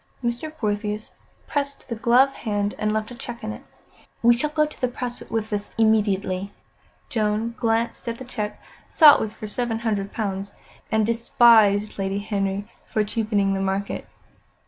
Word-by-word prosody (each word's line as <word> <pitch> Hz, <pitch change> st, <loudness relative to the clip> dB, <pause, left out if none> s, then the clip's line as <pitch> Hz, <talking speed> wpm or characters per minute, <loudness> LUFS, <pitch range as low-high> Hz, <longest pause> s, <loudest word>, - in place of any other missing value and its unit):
Mr. 240 Hz, +6 st, -2 dB
Portheous 210 Hz, -2 st, -2 dB, 0.3 s
pressed 280 Hz, -1 st, -3 dB
the 235 Hz, -, -3 dB
gloved 250 Hz, +4 st, +4 dB
hand 205 Hz, -2 st, -1 dB
and 215 Hz, 0 st, +1 dB
left 215 Hz, +2 st, -2 dB
a -, -, -7 dB
cheque 235 Hz, 0 st, -8 dB
in 215 Hz, -, -3 dB
it. -, -, -10 dB, 0.6 s
"We 240 Hz, +1 st, +7 dB
shall 295 Hz, +5 st, 0 dB
go 305 Hz, 0 st, +2 dB
to 295 Hz, -4 st, -3 dB
press 245 Hz, 0 st, -5 dB
with 220 Hz, -1 st, -2 dB
this 205 Hz, 0 st, -4 dB
immediately." 200 Hz, -3 st, +1 dB, 0.6 s
Joan 215 Hz, +1 st, 0 dB
glanced 230 Hz, +2 st, 0 dB
at 230 Hz, -, -4 dB
the 260 Hz, -, -9 dB
cheque, 210 Hz, -4 st, -4 dB, 0.3 s
saw 305 Hz, -3 st, +8 dB
it -, -, +1 dB
was 215 Hz, -1 st, -2 dB
for -, -, -7 dB
seven 225 Hz, +2 st, -2 dB
hundred 205 Hz, -4 st, -1 dB
pounds, 200 Hz, -3 st, -4 dB, 0.4 s
and 220 Hz, -1 st, +3 dB
despised 220 Hz, -3 st, +4 dB
Lady 195 Hz, 0 st, -1 dB
Henry 200 Hz, -1 st, -2 dB, 0.2 s
for 215 Hz, -3 st, +1 dB
cheapening 210 Hz, -2 st, 0 dB
the 195 Hz, -, -1 dB
market. 195 Hz, +1 st, -2 dB
220 Hz, 165 wpm, -24 LUFS, 205-235 Hz, 0.6 s, saw